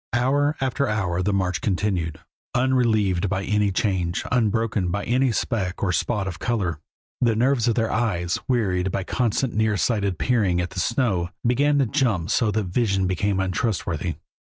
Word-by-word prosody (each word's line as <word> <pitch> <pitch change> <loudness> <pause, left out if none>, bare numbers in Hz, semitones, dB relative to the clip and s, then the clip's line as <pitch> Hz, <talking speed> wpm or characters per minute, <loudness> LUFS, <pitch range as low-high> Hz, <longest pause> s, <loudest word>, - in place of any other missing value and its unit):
Hour 140 +5 +2
after 135 +1 0
hour 95 -5 -1
the 100 +3 0
march 90 -5 0
continued, 90 -5 -1 0.4
unrelieved 110 -8 +2
by 95 -1 -1
any 105 0 +1
change, 95 -3 -1
unbroken 110 -5 +1
by 100 +3 -2
any 130 +1 +2
speck 100 -6 -2
or 95 - +2
spot 100 +2 -1
of 90 -2 -5
color. 95 -10 -1 0.4
The 115 -3 +3
nerves 125 +1 +2
of 115 - +2
their 115 -2 0
eyes, 90 -7 0
wearied 95 -7 +1
by 95 - -2
constant 120 +4 0
nearsighted 105 -3 +1
peering 100 -5 +1
at 90 0 -2
the 95 - -5
snow, 95 -4 0 0.2
began 145 +4 +3
to 140 - +3
jump 110 - 0
so 115 -1 +2
that 105 +1 0
vision 95 0 0
became 95 +2 0
untrustworthy. 90 - -1
105 Hz, 160 wpm, -23 LUFS, 90-120 Hz, 0.4 s, The